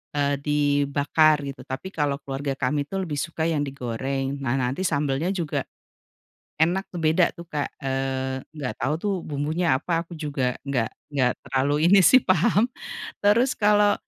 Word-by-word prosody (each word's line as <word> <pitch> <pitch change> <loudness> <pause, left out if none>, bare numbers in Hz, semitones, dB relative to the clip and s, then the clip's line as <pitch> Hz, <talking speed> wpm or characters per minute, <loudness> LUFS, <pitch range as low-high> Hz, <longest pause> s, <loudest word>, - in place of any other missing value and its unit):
eee, 140 -1 +1
dibakar 145 +1 +2
gitu, 140 0 -7
tapi 135 +9 -5
kalo 145 -4 0
keluarga 135 0 -3
kami 145 +2 -1
tuh 195 +2 -2
lebih 150 -5 -3
suka 160 0 -3
yang 160 -2 +1
digoreng 135 0 -3
nah 130 -1 -1
nanti 135 +8 0
sambelnya 145 +2 0
juga 165 -5 -2 0.9
enak 180 +4 +2
tuh 170 - -4
beda 160 +3 +3
tuh, 170 0 -11
Kak, 145 -1 -1
eee, 130 0 -2 0.2
nggak 145 -5 -4
tau 150 - 0
tuh 195 -4 -2
bumbunya 155 +2 0
apa 170 -1 -1
aku 170 - -11
juga 145 -5 -1
nggak 130 -5 -1 0.2
nggak 130 -4 +2
terlalu 135 +2 0 0.2
ini 200 0 +7
sih 260 -1 +7
paham 205 +6 +3 0.5
terus 230 +6 +4
kalau, 205 -1 +4
145 Hz, 160 wpm, -24 LUFS, 135-170 Hz, 0.9 s, ini